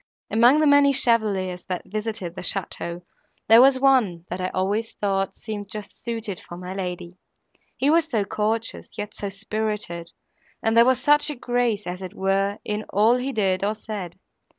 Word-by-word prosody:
Among 240 +6 +5
the - - +4
many 285 -1 +5
chevaliers, 200 -8 +1
that 180 -1 -3
visited 215 -1 -4
at 170 - -20
the - - -6
château, 175 -2 -3 0.4
there 225 +2 +8
was 260 0 +5
one, 235 -11 +3
that 180 +1 -3
I 185 - 0
always 205 +5 -1
thought 195 -1 -1
seemed 205 -2 -6
just 205 0 -8
suited 225 -5 -4
for 175 - -11
my 180 +1 -7
lady; 180 -2 -5 0.6
he 275 +3 +2
was 325 0 +3
so 220 -7 0
courteous, 220 +3 -2
yet 210 0 -5
so 200 - -4
spirited, 210 -4 -4 0.5
and 225 0 +1
there 230 0 +7
was 255 0 +3
such 295 +3 +4
a 295 - -3
grace, 240 -4 -1
as 180 +1 -5
it 185 -2 -8
were, 195 +1 0
in 210 0 -2
all 220 +5 +4
he 260 +2 -2
did, 195 -5 0
or 210 +2 0
said. 205 -5 -7
210 Hz, 180 wpm, -24 LUFS, 190-235 Hz, 0.6 s, there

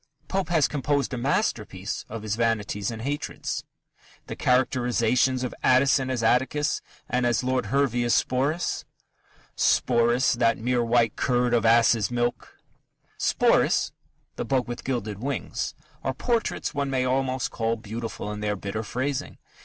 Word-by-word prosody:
Pope 190 -2 -1
has 160 -4 +3
composed 140 -1 -1
a - - -2
masterpiece 115 - -1
of 110 0 -6
his 105 -1 -1
vanities 110 -3 0
and 115 -1 -6
hatreds. 145 +3 -3 0.6
The - - -6
characterizations 125 0 +2
of 125 - -3
Addison 130 +1 +4
as 125 -3 -1
Atticus, 130 +5 +1 0.3
and 125 0 0
of 120 0 +1
Lord 130 0 0
Hervey 135 -3 +1
as 120 - +2
Sporus: 140 +7 0 0.7
Sporus, 120 +1 +3
that 115 -1 +3
mere 120 +1 0
white 115 -2 +2
curd 125 -1 +1
of 115 -1 +3
ass's 115 -2 +4
milk 120 0 -2 0.6
Sporus, - - +3 0.5
"the - - -2
bug 130 -3 0
with 120 0 -6
gilded 110 -6 -3
wings" 135 +2 -3 0.3
are 130 - -1
portraits 235 - -1
one 140 -2 -1
may 130 -1 0
almost 130 0 0
call 115 0 0
beautiful 110 -1 -6
in 105 - -5
their 105 -1 -1
bitter 100 +2 -4
phrasing. 130 +5 -3
125 Hz, 145 wpm, -26 LUFS, 115-130 Hz, 0.7 s, Addison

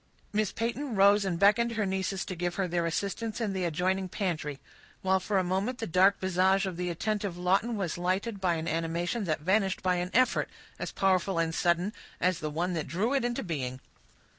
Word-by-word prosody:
Miss 215 -1 +1
Peyton 235 +3 -3
rose 200 +1 +5
and 180 -3 -1
beckoned 220 +5 +4
her 215 -2 0
nieces 190 0 -2
to 185 - -5
give 175 0 -2
her 195 -2 0
their 170 -1 0
assistance 205 +6 -2
in 215 -4 -1
the 185 -2 -1
adjoining 185 +3 0
pantry, 155 -8 -3 0.4
while 190 0 +3
for 200 +2 -1
a 190 - +3
moment 190 +7 -1
the 230 - -3
dark 190 +3 +4
visage 190 +1 +2
of 190 -2 -3
the 180 +1 -2
attentive 200 +1 -2
Lawton 195 +6 +1
was 175 -4 -2
lighted 190 +4 -1
by 180 -3 +2
an 160 0 -4
animation 170 +6 -1
that 155 -3 -1
vanished 190 +2 +1
by 180 -1 +2
an 175 +1 -2
effort, 255 +5 +2 0.3
as - - -4
powerful 190 -1 +1
and 165 -1 +2
as 160 - -5
sudden, 175 +4 +1 0.3
as 180 -1 +1
the 155 - -3
one 175 +4 -1
that 160 -3 -2
drew 195 - 0
it 275 - +2
into 240 0 -1
being. 130 -7 -3
185 Hz, 210 wpm, -29 LUFS, 175-205 Hz, 0.4 s, rose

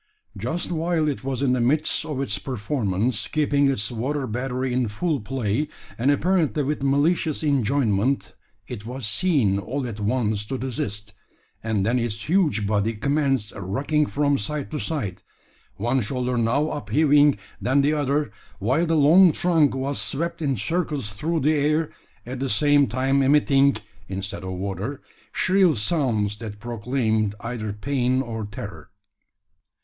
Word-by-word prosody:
Just 125 - -2
while 165 -1 0
it 140 -3 -2
was 135 0 -2
in 130 -2 +3
the 125 - +1
midst 150 +5 +1
of 150 -4 -3
its 105 -8 -2
performance, 110 -2 -1
keeping 145 -2 +2
its 105 -4 -1
water 135 +5 -2
battery 125 +2 -2
in 125 -1 +1
full 145 +8 -1
play, 120 +4 -1 0.3
and 125 +4 +1
apparently 155 - +2
with 145 +1 -2
malicious 145 +3 +1
enjoyment, 135 -3 +1 0.3
it 115 -4 -7
was 125 +2 -5
seen 110 - +2
all 130 +7 -3
at 110 -3 -6
once 105 -1 0
to 135 - -3
desist; 110 -5 -4 0.5
and 110 -3 0
then 120 +3 +2
its 115 -2 -3
huge 155 - +2
body 105 +2 +1
commenced 135 -1 0
rocking 135 +10 0
from 145 -1 +1
side 145 +9 -3
to 150 - -3
side, 140 - -3 0.5
one 120 +5 0
shoulder 125 +2 -2
now 125 +6 +1
upheaving, 145 -2 +3 0.2
then 140 +3 +2
the 145 +2 +3
other, 145 -3 0 0.3
while 130 - +1
the 165 - +2
long 165 +5 +7
trunk 160 -5 +2
was 135 -3 -2
swept 165 +11 -2
in 140 -3 +1
circles 145 - -1
through 155 - -2
the 150 +4 +3
air, 150 +1 +1 0.3
at 125 +2 -6
the 135 0 -2
same 145 +4 +4
time 130 +4 +1
emitting, 140 0 +4 0.3
instead 95 0 -4
of 95 0 -4
water, 100 +8 -4 0.3
shrill 185 -4 +3
sounds 110 -5 0
that 105 -2 -8
proclaimed 110 -2 -1
either 115 -3 -4
pain 130 +3 0
or 115 -3 -5
terror. 95 -7 -8
130 Hz, 150 wpm, -24 LUFS, 110-145 Hz, 0.5 s, long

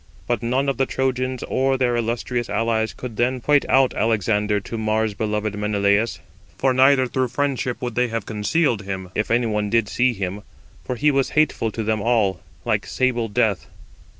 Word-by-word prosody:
But 120 -3 -1
none 130 +4 0
of 140 - 0
the 135 -1 +1
Trojans 130 -1 -1
or 135 0 +1
their 125 -2 +1
illustrious 120 0 -2
allies 110 +1 0
could 120 -4 -8
then 125 +2 +1
point 145 +3 +2
out 135 -1 +4
Alexander 105 -1 +1
to 100 - -7
Mars 110 -1 0
beloved 105 0 -2
Menelaus; 105 +1 +1 0.4
for 130 -1 +2
neither 130 +1 +5
through 130 +1 -1
friendship 130 -1 -2
would 120 -1 -2
they 125 +2 +1
have 115 -1 -4
concealed 115 +3 0
him, 95 -2 -6
if 105 - -1
any 120 +1 +2
one 105 -2 -1
did 115 -1 +2
see 125 +3 +1
him; 100 -1 -4 0.4
for 125 - -3
he 150 +5 +3
was 135 -1 +1
hateful 155 -7 +2
to 115 - -3
them 110 -1 0
all, 105 -6 +1 0.2
like - - 0
sable 125 -3 0
death. 100 - 0
115 Hz, 180 wpm, -22 LUFS, 105-130 Hz, 0.4 s, neither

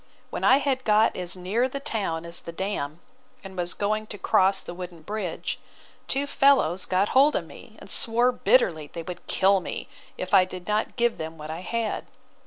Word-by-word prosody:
When - - -4
I 260 +1 +7
had 270 -2 0
got 215 0 +4
as 180 0 -3
near 210 +8 0
the 275 - -4
town 200 - -2
as 170 +1 -2
the 170 - -7
dam, 170 -4 -4 0.4
and 190 -1 -9
was 175 -1 -2
going 215 +1 -1
to 210 - -7
cross 195 0 +2
the - - -7
wooden 175 -2 -8
bridge, 205 -3 -4 0.5
two 275 +1 +1
fellows 270 - +3
got 190 +2 +2
hold 280 +3 +5
of - - -1
me, - - -14
and - - -12
swore 240 +2 +3
bitterly 170 - +2
they 165 - -6
would 175 +1 -8
kill 195 +1 +3
me, 180 - -6 0.3
if 185 - -5
I 190 -2 +8
did 185 -1 -8
not 210 +1 0
give 235 -1 +1
them 160 +1 -5
what 155 0 -7
I 160 - -5
had. 225 +3 -3
195 Hz, 195 wpm, -26 LUFS, 175-230 Hz, 0.5 s, I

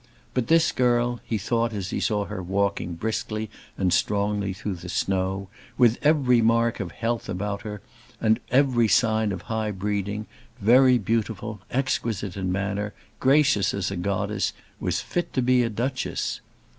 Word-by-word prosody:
But 125 -3 0
this 165 0 +4
girl, 120 -1 +1
he 110 - -2
thought 115 +3 0
as 100 -2 -4
he - - -1
saw 105 -4 0
her 95 - -5
walking 95 -1 -1
briskly 110 +2 -3 0.3
and 90 -2 +1
strongly 100 +1 +1
through 95 -1 -4
the 90 +1 -9
snow, 95 +1 -1 0.3
with 120 -2 +4
every 140 -5 +4
mark 115 +1 +2
of 90 -4 -4
health 115 0 -2
about 100 +1 -3
her, 105 -3 -6 0.4
with 110 0 +3
every 125 -3 +4
sign 110 -2 +3
of 90 -2 -5
high 110 -1 -2
breeding, 105 +1 -2 0.3
very 125 +4 +6
beautiful, 110 -1 -2
exquisite 115 -7 -1
in 95 -2 -2
manner, 100 +2 -2 0.2
gracious 135 -8 +3
as 100 -1 -2
a - - -3
goddess, 100 +3 -1 0.3
was - - -1
fit 175 - -3
to 130 - +1
be 125 0 +4
a 120 - +1
Duchess! 125 +4 -2
105 Hz, 155 wpm, -25 LUFS, 100-120 Hz, 0.4 s, very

